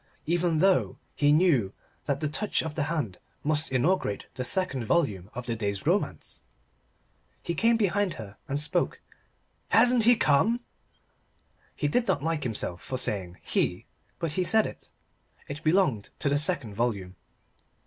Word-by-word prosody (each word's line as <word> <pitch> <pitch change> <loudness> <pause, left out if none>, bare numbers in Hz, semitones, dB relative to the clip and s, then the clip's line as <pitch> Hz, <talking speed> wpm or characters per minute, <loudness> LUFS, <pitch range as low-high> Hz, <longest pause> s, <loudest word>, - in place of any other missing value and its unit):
Even 170 0 +1
though 190 +3 +2 0.2
he 145 0 +3
knew 145 - +3 0.3
that 140 0 -1
that 150 -1 -2
touch 210 +4 0
of 160 -2 -4
the 150 -2 -1
hand 145 - -3 0.2
must 150 0 0
inaugurate 135 - 0
the 130 - -4
second 135 -2 +1
volume 110 - 0
of 125 0 -5
the 115 -1 -2
day's 100 -3 -3
romance. - - -1 1.0
He 170 - -2
came 230 +7 +3
behind 205 -2 +1
her 105 -2 -9
and 140 0 -1
spoke. 150 - -1 0.7
"Hasn't 240 0 +5
he 240 +1 +7
come?" 220 +8 +2 1.1
He 145 - -1
did 235 +11 +1
not 140 - +1
like 160 -1 -1
himself 105 -7 -3
for 130 - -4
saying 95 -7 -3
"he" - - -1 0.3
but 165 - -2
he 180 +5 0
said 220 +4 +4
it. - - -8 0.6
It 145 +2 -7
belonged 155 - +2
to 145 - 0
the 145 +1 +2
second 150 - 0
volume. 100 -5 -2
150 Hz, 155 wpm, -27 LUFS, 115-180 Hz, 1.1 s, he